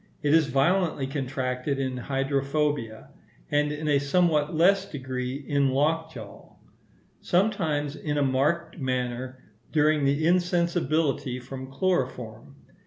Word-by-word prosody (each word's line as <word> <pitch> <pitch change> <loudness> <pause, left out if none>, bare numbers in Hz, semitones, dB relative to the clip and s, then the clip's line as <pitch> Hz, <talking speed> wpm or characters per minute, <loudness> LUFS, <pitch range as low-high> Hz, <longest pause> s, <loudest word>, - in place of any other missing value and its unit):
It 145 0 +3
is 160 -2 +5
violently 150 +2 +1
contracted 135 0 -2
in 130 -1 -2
hydrophobia, 135 -2 -1 0.4
and 150 0 +2
in 150 +1 -4
a 145 -2 +3
somewhat 150 0 +1
less 190 +5 +4
degree 130 -2 -4
in 140 -1 +2
lockjaw; 160 +4 -2 0.7
sometimes 165 -7 0
in 150 -1 -3
a 145 - +2
marked 155 +6 0
manner 130 0 -3 0.3
during 155 -1 +3
the 140 +3 +1
insensibility 170 -6 +1
from 130 +1 -8
chloroform. 130 -7 -2
145 Hz, 110 wpm, -26 LUFS, 130-160 Hz, 0.7 s, is